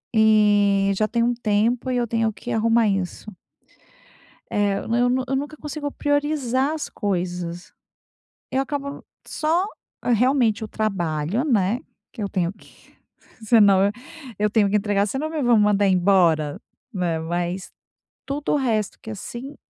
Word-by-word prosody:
eh, 205 -2 +4
já 215 +2 +1
tem 235 0 0
um 240 +1 +2
tempo 230 +3 0
e 250 - 0
eu 240 -1 0
tenho 225 0 0
que 240 +4 -8
arrumar 225 0 +3
isso. 195 +2 -3 1.2
É, 205 -1 +1
m 230 +1 0
eu 245 0 +3
nu 255 +1 +1
eu 270 - -1
nunca 290 +3 -3
consigo 295 -1 -5
priorizar 290 -2 0
as 315 - -4
coisas. 180 -3 -3 0.8
Eu 265 - +1
acabo 280 0 -5 0.2
só 330 +4 0 0.4
realmente 240 -2 +2
o - - -7
trabalho, 190 - -1
né, 225 -3 +1 0.3
que 225 - -7
eu 200 - -2
tenho 180 -2 -1
que - - -22 0.5
senão 200 -3 +5 0.5
eu 210 0 +2
tenho 210 -2 +3
que 210 - +3
entregar 205 0 +1
senão 270 +8 -3
me 310 -3 -2
vão 240 -2 +4
mandar 205 -1 +3
embora, 175 -5 +3 0.3
né, 175 -5 -1
mas 175 +3 -3 0.6
tudo 285 +1 -2
o - - +3
resto 225 -7 -1
que 220 - -9
assim, 240 +7 -7
215 Hz, 150 wpm, -23 LUFS, 195-255 Hz, 1.2 s, senão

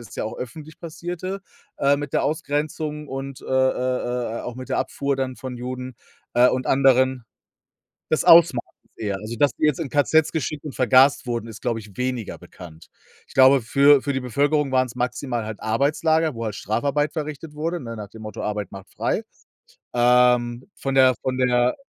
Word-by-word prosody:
es 115 -3 -12
ja - - -2
auch 110 - -5
öffentlich 150 +5 -9
passierte 175 +3 -6 0.6
mit, 145 +1 -4
äh, - - -37
der - - +1
Ausgrenzung 150 0 -2
und, 135 0 -6
äh, - - -13
äh, 125 -2 0
äh, - - -5
auch 120 - -6
mit 130 +1 -9
der - - 0
Abfuhr 140 0 -1
dann 130 -1 -3
von 130 -2 -7
Juden, 125 +1 -6 0.4
äh, 125 +1 +6
und 130 0 -1
anderen. 130 -2 +3 0.9
Des 155 - +2
Ausmaßes, 165 -7 +7 0.4
eher. 100 -3 -2
Also, 110 +3 -6
dass 145 +2 +3
die - - 0
jetzt 150 0 +1
in 160 -5 -3
KZs 145 +3 +3
geschickt 155 -2 -3
und 145 - -6
vergast 130 +3 +4
wurden, 120 -2 -3
ist, 110 -2 -10
glaube 115 -2 -1
ich, 105 -3 -14
weniger 125 -3 -3
bekannt. 80 -3 -13 0.4
Ich - - -17
glaube, 135 0 +6
für 140 +4 +5
für 140 +1 -1
die 135 - -1
Bevölkerung 140 +3 0
waren's 130 -2 +1
maximal 125 -1 -2
halt 110 -1 -6
Arbeitslager, 155 +6 +1
wo 115 0 -4
halt 105 - -4
Strafarbeit 140 +9 -1
verrichtet 155 -1 -6
wurde, 165 +3 -2
ne, 115 -5 -7
nach 105 -2 -8
dem 110 - -13
Motto 110 0 -7
Arbeit 105 -2 -3
macht 95 -1 -11
frei. - - -1 0.7
Ähm, 125 +4 +3
von 135 -1 -3
der 130 -1 +6
von 130 -1 -1
der 125 -1 +2
130 Hz, 185 wpm, -23 LUFS, 120-145 Hz, 0.9 s, Ausmaßes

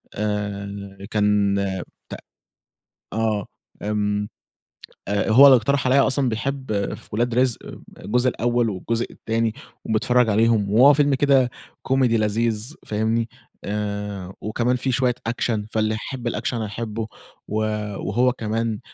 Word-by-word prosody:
آآ 100 -1 -4
كان 105 -1 +2 0.5
ت - - -8 1.0
آه، 110 -1 0 0.4
آمم 105 0 -1 0.8
آآ 100 +2 0
هو 125 +6 +8
اللي 135 -2 +9
اقترح 130 +3 0
عليّا 135 +2 +4
أصلًا 130 -1 +2
بيحب 115 -3 -2
في - - -10
ولاد 115 +2 0
رزق 125 -1 +2
آآ - - -10 0.2
الجزء 125 +3 +2
الأول 120 -1 0
والجزء 115 +4 -2
التاني 115 0 -1 0.3
وبيتفرّج 120 +2 +2
عليهم 110 -1 +3
وهو 130 +7 +7
فيلم 145 0 +3
كده 135 -2 +3 0.4
comedy 135 0 +3
لذيذ 110 +3 0
فاهمني؟ 110 +2 0 0.4
آآ 100 -2 -4
وكمان 120 +4 0
في 130 +1 -1
شوية 125 0 +2 0.2
action 115 -2 -1
فاللي 110 0 +1
يحب 120 +2 -4
الaction 120 - -2
هيحبه، 110 0 -4 0.4
و 105 - -4 0.4
وهو 125 +5 +1
كمان 115 -1 -2
115 Hz, 125 wpm, -23 LUFS, 105-125 Hz, 1.0 s, اللي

